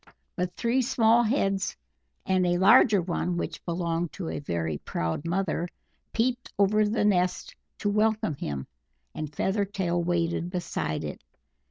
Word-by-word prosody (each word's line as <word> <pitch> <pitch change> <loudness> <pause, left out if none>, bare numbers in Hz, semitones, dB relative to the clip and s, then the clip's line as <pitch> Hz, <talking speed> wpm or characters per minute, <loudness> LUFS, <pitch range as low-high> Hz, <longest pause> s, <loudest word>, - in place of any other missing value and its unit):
But 180 -2 -2
three 240 +3 +2
small 235 -2 +4
heads, 195 -5 0 0.5
and 185 -1 +2
a 175 0 +2
larger 205 0 +6
one, 175 0 -1
which - - -4
belonged 170 -1 -1
to 180 -4 -5
a - - -3
very 80 - -2
proud 85 - -3
mother, 175 -1 -1 0.4
peeped 245 +2 -1
over 210 +2 +4
the 210 0 +1
nest 180 -3 +1 0.2
to - - -2
welcome 215 -4 +2
him, 70 - -4 0.5
and 155 -2 -5
Feathertail 190 -1 0
waited 170 0 0
beside 175 - -3
it. 75 -1 -6
180 Hz, 140 wpm, -27 LUFS, 170-210 Hz, 0.5 s, larger